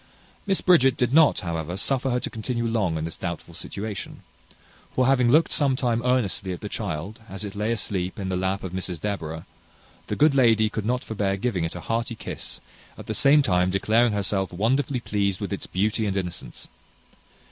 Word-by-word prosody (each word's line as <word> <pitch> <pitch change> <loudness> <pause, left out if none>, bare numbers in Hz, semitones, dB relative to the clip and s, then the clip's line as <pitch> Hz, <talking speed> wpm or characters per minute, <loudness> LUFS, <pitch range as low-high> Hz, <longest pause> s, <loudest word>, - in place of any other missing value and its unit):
Miss 195 -1 +2
Bridget 160 -8 +5
did 125 +1 +1
not, 155 -6 +5
however, 85 -1 -3
suffer 135 +5 +1
her 125 0 +1
to - - -3
continue 115 +2 -2
long 105 -8 0
in 80 - -3
this 80 - -4
doubtful 85 -1 -5
situation; 100 +4 -6 0.7
for 130 - +3
having 125 -2 +4
looked 155 +6 +4
some 140 -3 +3
time 120 -3 0
earnestly 120 -7 +1
at 90 - -6
the 105 - -5
child, 100 +2 -4
as 95 +2 -7
it 100 - -6
lay 105 +2 -1
asleep 95 -5 -2
in 95 - -4
the 95 - -1
lap 95 +2 -1
of 95 - -5
Mrs 90 -2 -3
Deborah, 80 -6 -4 0.6
the - - -2
good 150 0 +4
lady 115 -5 +4
could 110 -1 -3
not 125 +1 0
forbear 100 -3 -1
giving 95 -6 -1
it 80 - -5
a 90 - -6
hearty 115 +3 -2
kiss, - - -6 0.4
at - - -9
the - - -3
same 145 +1 +5
time 90 -6 +2
declaring 110 +5 +2
herself 100 -1 0
wonderfully 125 +7 0
pleased 100 -4 -1
with 100 -1 -3
its 100 - -5
beauty 105 +3 0
and 100 -1 -1
innocence. 90 -9 -5
105 Hz, 195 wpm, -25 LUFS, 95-125 Hz, 0.7 s, Bridget